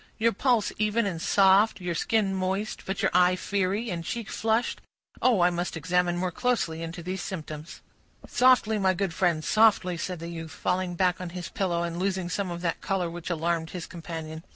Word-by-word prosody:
"Your 230 +1 +2
pulse 240 -1 +2
even 215 +2 +2
and 175 -5 -3
soft, 195 +4 +4
your 175 -1 -2
skin 205 +2 +1
moist, 190 +3 -2
but 190 - -2
your - - +3
eye 180 0 +5
fiery, 200 +4 -1
and 170 -1 -3
cheek 225 +5 -4
flushed. 225 +2 0 0.4
Oh! 235 -7 +4
I 175 +1 +5
must 175 0 -3
examine 175 +2 +1
more 180 0 -1
closely 205 -8 -1
into 165 +1 -6
these 185 +1 -4
symptoms." 155 -4 -7 0.5
"Softly, 245 -4 +4
my 190 -1 +2
good 190 -2 -1
friend, 170 -3 +1
softly," 205 -5 +3
said 180 +1 -3
the 165 +1 -7
youth, 165 -1 -6
falling 180 +2 -2
back 180 0 +1
on 180 - -4
his 180 0 -5
pillow, 175 -3 -1
and 170 0 -3
losing 185 -1 -1
some 195 +2 -2
of 175 0 -5
that 170 -2 -2
color 185 -3 -1
which 175 0 -6
alarmed 165 -1 -1
his 180 -2 -6
companion. 160 -2 -7
180 Hz, 195 wpm, -27 LUFS, 170-200 Hz, 0.5 s, eye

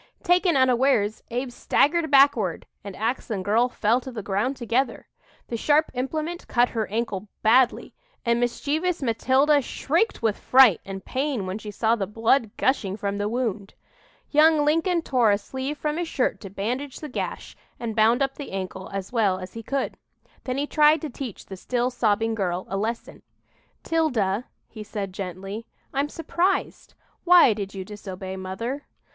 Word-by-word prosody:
Taken 355 -4 +3
unawares, 255 -4 +2
Abe 245 +2 -3
staggered 315 +6 +1
backward 280 0 +4 0.2
and 200 -2 -8
ax 230 +5 -2
and 195 -4 -3
girl 230 +5 +3
fell 235 +1 +1
to 260 - -8
the 220 -4 -6
ground 210 +8 -1
together. 240 +1 -1 0.4
The 235 - -3
sharp 300 +6 +2
implement 310 +7 -3
cut 245 0 +3
her 220 -3 -2
ankle 210 -2 -3 0.2
badly, 245 +3 +3 0.3
and 235 0 +2
mischievous 295 +8 -1
Matilda 265 +5 +3
shrieked 330 - -1
with 220 -2 +1
fright 250 -9 +6
and 195 -1 -7
pain 265 -6 -2
when 185 +3 -4
she 215 - -8
saw 220 +2 +1
the 195 -4 -3
blood 225 +3 +2
gushing 210 -7 0
from 200 -1 -3
the 205 +1 -1
wound. 220 -4 -3 0.6
Young 305 0 +5
Lincoln 330 +3 +2
tore 250 -7 +3
a 200 - +4
sleeve 265 +7 -5
from 300 +1 -2
his 345 -1 -2
shirt 260 - -1
to 200 - -8
bandage 245 +8 -4
the 305 - -6
gash 260 - -5 0.2
and 230 -2 -4
bound 230 +4 +4
up 270 0 -1
the 280 -8 -8
ankle 190 0 -5
as 195 -1 -5
well 205 -6 +2
as 185 0 -8
he 230 - -6
could. 275 +5 -3 0.5
Then 255 0 -2
he 285 - 0
tried 300 +1 +4
to 310 -4 -5
teach 245 -5 -7
the 190 - -8
still 245 +6 -1
sobbing 225 -2 +1
girl 185 -4 -2
a 195 - -3
lesson. 225 +4 -4 0.6
"'Tilda," 250 -10 0 0.2
he 215 -2 -9
said 200 -2 -5
gently, 195 +4 -6 0.3
"I'm 280 +2 0
surprised. 345 +5 -1 0.3
Why 350 -9 +7
did 200 -1 -6
you 190 -1 -5
disobey 190 -2 -7
mother?" 230 +9 -5
235 Hz, 170 wpm, -25 LUFS, 205-280 Hz, 0.6 s, Why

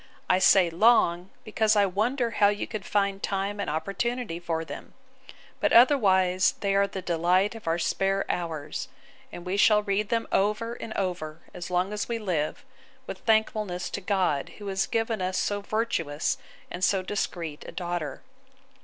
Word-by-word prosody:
I 185 - +3
say 185 -2 +5
long, 180 -2 +3
because 220 0 +1
I 205 -1 +5
wonder 230 +6 0
how 205 -3 +4
you 205 0 -1
could 215 -4 -6
find 200 -1 0
time 200 +1 -2
and 200 - -2
opportunity 200 +5 -2
for 165 -2 -3
them: 145 -2 -9 0.6
but - - +1
otherwise 190 -8 +5
they 200 -1 +1
are 200 0 +3
the 190 -1 -6
delight 180 +4 +2
of 225 -6 -11
our 165 +1 +2
spare 195 +3 0
hours; 160 - -3 0.4
and 175 - -9
we 185 +2 -1
shall 210 0 +5
read 205 0 -1
them 230 -1 0
over 215 +4 +1
and 230 - -8
over, 170 -4 -3
as 175 - -7
long 180 +3 0
as 210 +2 -3
we 235 - -1
live, 175 -9 -2 0.4
with - - -7
thankfulness 215 -5 0
to 200 - -4
God, 185 -8 0
who 205 - -9
has 195 0 0
given 225 -2 -1
us 185 0 -1
so 205 0 -1
virtuous 185 -9 -1 0.3
and 180 - -5
so 190 -1 +2
discreet 170 -6 -4
a - - -7
daughter. 175 -4 -4
195 Hz, 170 wpm, -27 LUFS, 175-210 Hz, 0.6 s, say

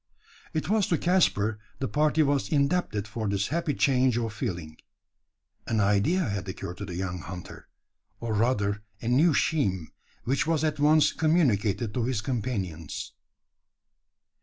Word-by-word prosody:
It 155 - -2
was 210 0 +2
to 165 - +2
Caspar 110 - +2 0.2
the 135 - -2
party 155 +2 +2
was 140 -1 +1
indebted 140 - +1
for 110 0 -4
this 100 0 0
happy 160 -2 -1
change 130 -3 +3
of 115 -2 -2
feeling. 85 -7 -4 0.9
An 110 -2 0
idea 105 - +2
had 100 - -3
occurred 90 -1 -6
to 100 - -5
the 90 -3 -6
young 90 0 -3
hunter 90 0 -9 0.5
or 115 -2 -3
rather 105 -2 +1 0.2
a - - -6
new 145 +6 +4
scheme 95 - 0 0.3
which 135 +4 0
was 160 -2 +1
at 155 -2 0
once 150 +1 +4
communicated 120 - +1
to 120 -3 0
his 125 -4 -1
companions. 100 - -4
120 Hz, 145 wpm, -27 LUFS, 100-150 Hz, 0.9 s, new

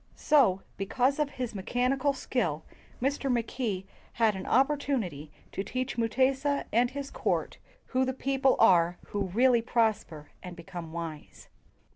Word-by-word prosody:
So, 240 -11 +3
because 255 +8 0
of 300 -2 +1
his 250 -5 -5
mechanical 250 +7 0
skill, 170 - -2 0.4
Mr. 275 +1 0
Mackay 230 -5 -2 0.3
had 225 -3 +2
an 190 - -6
opportunity 260 - 0 0.2
to - - -3
teach 255 +4 -3
Mu 230 -1 +1
tesa 270 +4 +1
and 240 +2 +3
his 280 +1 -6
court - - -2 0.3
who 260 0 0
the 260 - 0
people 270 0 +1
are 175 -1 +4
who 200 -1 -2
really 240 +5 +3
prosper 220 -10 -1
and 180 -1 -8
become 170 -1 -8
wise. 165 -3 -8
235 Hz, 140 wpm, -29 LUFS, 185-265 Hz, 0.4 s, are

